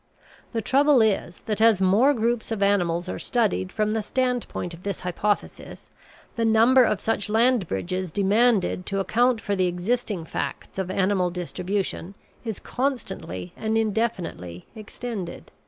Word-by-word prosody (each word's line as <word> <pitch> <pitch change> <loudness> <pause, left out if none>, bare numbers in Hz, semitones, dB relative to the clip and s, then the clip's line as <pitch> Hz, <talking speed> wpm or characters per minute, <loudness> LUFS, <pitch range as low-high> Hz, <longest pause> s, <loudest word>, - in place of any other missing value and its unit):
The 225 -3 -2
trouble 280 +2 +4
is 195 -5 -1
that 215 0 -1
as 225 -3 +5
more 200 +9 +4
groups 230 0 -1
of 210 -3 0
animals 175 -3 +1
are - - -4
studied 215 -6 0
from 215 0 0
the 220 0 0
standpoint 250 -6 -2
of 165 - -11
this 200 -1 -4
hypothesis 195 +3 -3 0.4
the 230 - -1
number 230 +4 +5
of 210 -4 +1
such 215 -2 -1
land 230 -2 +3
bridges 185 - -3
demanded 200 +1 +2
to 195 -1 -1
account 240 +4 +2
for 205 - -1
the 185 -1 +2
existing 185 0 -2
facts 175 - -5
of 190 -1 -2
animal 190 -1 +1
distribution 180 +2 -3 0.3
is 225 -4 -4
constantly 195 - -4
and 220 0 -1
indefinitely 205 - -2
extended. 215 -4 -7
205 Hz, 145 wpm, -24 LUFS, 185-230 Hz, 0.4 s, as